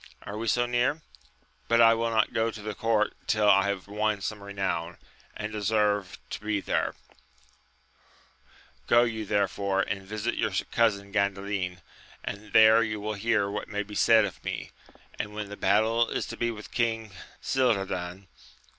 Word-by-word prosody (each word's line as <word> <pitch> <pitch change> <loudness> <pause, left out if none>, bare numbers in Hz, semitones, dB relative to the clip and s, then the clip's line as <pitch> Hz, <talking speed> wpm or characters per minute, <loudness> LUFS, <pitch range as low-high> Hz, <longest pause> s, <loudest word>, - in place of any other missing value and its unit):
— - - -36
^Are 105 +2 -5
we 115 - -3
so 120 +3 +2
near? 125 +6 0 0.6
but 115 0 +3
I 115 -1 +8
will 115 0 0
not 110 -1 +1
go 115 -1 +1
to 110 -1 -8
the 105 0 -4
court 110 -1 +1
till 105 -1 +2
I 100 -1 +5
have 100 -1 -3
won 105 0 0
some 105 +1 -4
renown, 95 -4 -3 0.4
and 105 0 -5
deserve 105 -2 0
to - - -4
be 105 -1 0
there: - - -1 1.9
go 120 0 +6
you 110 -2 -2
therefore 100 -1 +1
and 100 - -3
visit 110 +4 -3
your 105 - 0 0.2
cousin 100 -4 +1
Gandalin, 100 -2 -1 0.4
and 105 +1 -6
there 110 +1 +7
you 105 -1 -2
will 105 +1 -3
hear 105 0 +1
what 105 +1 -4
may 105 0 -2
be 105 0 -12
said 110 +1 +5
of 95 - -8
me, - - -5 0.5
and 105 0 -4
when 105 -1 -5
the 100 - -7
battle 110 +4 +2
is - - -2
to - - -5
be 120 - -1
with 105 -2 -8
King 115 -3 -1 0.3
Cildadan. 95 -7 -1
105 Hz, 170 wpm, -27 LUFS, 100-115 Hz, 1.9 s, I